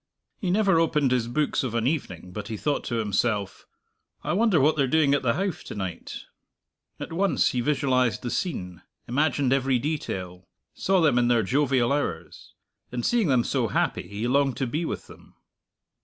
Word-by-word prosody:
He 190 - -2
never 195 -2 +3
opened 150 -5 +2
his 125 -2 +1
books 150 +5 0
of 125 -3 -3
an 115 -1 0
evening 95 - -3
but 100 +2 -6
he 110 - -4
thought 145 +6 -1
to 120 - -2
himself, 105 -1 -1 0.6
"I 155 - -1
wonder 205 -3 +3
what 155 +3 +4
they're 140 -3 +2
doing 145 0 +3
at 140 - +2
the 120 -2 +1
Howff 195 -1 -2
to - - -7
night?" 95 -4 -6 0.8
At - - -6
once 190 +2 +2
he 125 - -1
visualized 130 -3 +1
the 120 - -3
scene, 90 - -3 0.3
imagined 140 0 +1
every 135 -1 +2
detail, 95 - -4 0.3
saw 190 -1 +1
them 145 -6 +4
in 120 - +2
their 120 -2 +3
jovial 130 +2 +2
hours. 90 - -4 0.4
And, 120 -1 -3
seeing 235 -6 +2
them 130 -4 +3
so - - 0
happy, - - -1
he 105 +4 -3
longed 135 +1 +2
to 135 - 0
be 155 +7 -2
with - - -4
them. - - -17
130 Hz, 185 wpm, -25 LUFS, 115-155 Hz, 0.8 s, what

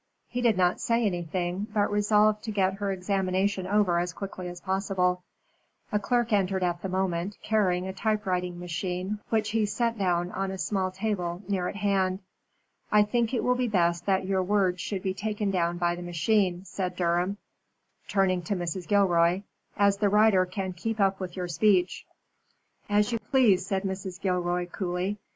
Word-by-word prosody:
He 245 - -3
did 230 -5 +3
not 180 -1 +2
say 230 0 +1
anything, 175 +1 -2
but 205 -1 +2
resolved 210 +1 +3
to 220 - -3
get 190 -2 +1
her 200 -1 -1
examination 190 0 0
over 195 -4 +2
as 175 0 -2
quickly 185 -1 -6
as 175 0 -7
possible. 190 -1 0 0.7
A 210 - +2
clerk 240 +1 0
entered 190 -2 +1
at 175 -1 -1
the 195 - -4
moment, 185 +1 -1
carrying 185 -5 +1
a 190 - -4
typewriting 185 -4 -1
machine, 180 +3 -3
which 215 -1 +1
he 225 0 +2
set 230 +1 -1
down 175 -2 +1
on 195 0 -2
a 190 - -4
small 190 0 -1
table 185 -2 -3
near 190 -3 0
at - - -5
hand. 190 -2 +1 0.7
"I 210 0 +6
think 230 +2 0
it 245 - -1
will 250 - +3
be 250 0 0
best 170 -4 +1
that 190 -1 +2
your 190 0 +1
words 185 -2 +1
should 195 -3 -4
be 190 - 0
taken 210 0 -2
down 175 -2 0
by 175 -1 +1
the 175 - -6
machine," 180 +2 0
said 185 -2 -4
Durham, 180 +2 0 0.7
turning 190 -3 +2
to 200 - -1
Mrs. 175 0 -4
Gilroy, 180 -2 +3 0.3
"as 200 -1 +4
the 205 0 +2
writer 210 -3 +4
can 185 0 -4
keep 220 +5 -4
up 195 -1 +2
with 185 -1 -6
your 180 -1 -2
speech." 180 +2 +2 0.8
"As 210 +2 +2
you 230 - -1
please," 210 -5 +3
said 195 0 -1
Mrs. 190 -2 -4
Gilroy, 180 -1 0
coolly. 180 +2 -3
190 Hz, 180 wpm, -27 LUFS, 180-210 Hz, 0.8 s, I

